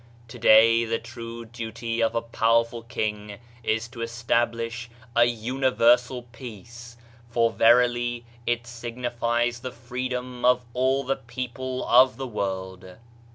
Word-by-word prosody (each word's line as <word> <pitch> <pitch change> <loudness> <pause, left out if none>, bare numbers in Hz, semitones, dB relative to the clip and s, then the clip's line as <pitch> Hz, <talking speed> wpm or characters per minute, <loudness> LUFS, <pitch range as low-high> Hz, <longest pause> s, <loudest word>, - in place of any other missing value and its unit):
Today, 115 0 +5
the 115 0 -1
true 115 0 -8
duty 115 0 -4
of 115 0 +1
a 115 - 0
powerful 115 0 +1
king 105 -3 -4 0.2
is 110 0 -1
to 120 -1 -9
establish 115 0 -1 0.3
a 120 0 +6
universal 125 +1 +2
peace; 120 0 -11 0.3
for 115 -1 +2
verily 120 +1 +3 0.2
it 120 0 0
signifies 120 0 -2
the 130 +1 -6
freedom 125 +1 -5
of 125 0 +4
all 130 +2 +1
the 135 +1 -1
people 130 +2 -5
of 130 +2 +6
the 135 - -4
world. 95 -4 -5
120 Hz, 120 wpm, -25 LUFS, 115-125 Hz, 0.3 s, a